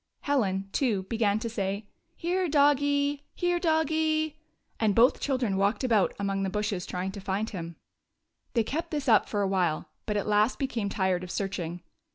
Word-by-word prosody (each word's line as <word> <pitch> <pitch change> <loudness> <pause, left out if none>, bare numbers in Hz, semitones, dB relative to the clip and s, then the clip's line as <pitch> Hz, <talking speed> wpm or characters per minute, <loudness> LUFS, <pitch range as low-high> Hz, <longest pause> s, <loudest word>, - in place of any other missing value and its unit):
Helen, 195 -9 0
too, 215 -8 +1
began 210 0 +1
to 230 +2 -3
say: 200 -2 -3 0.2
" - - -48
Here, 360 +1 0
doggie! 285 0 +3
Here, 350 -1 +1
doggie! 315 -1 +1 0.2
" - - -42
and 215 -3 +2
both 240 +3 +5
children 255 -8 0
walked 200 +5 +1
about 225 -6 +2
among 195 -1 -1
the 195 - 0
bushes 210 -2 -2
trying 185 +1 -3
to 200 0 -8
find 195 +3 -2
him. 170 -4 -6 0.8
They 230 - +4
kept 325 +9 -3
this 295 -3 -3
up 220 -4 +5
for 205 -1 0
a - - +1
while, 180 -5 0 0.2
but 210 -1 0
at 205 - -1
last 210 +3 +2
be 275 - 0
came 230 -6 -2
tired 190 -2 0
of 180 - -7
searching. 175 -3 -3
215 Hz, 190 wpm, -28 LUFS, 195-285 Hz, 0.8 s, both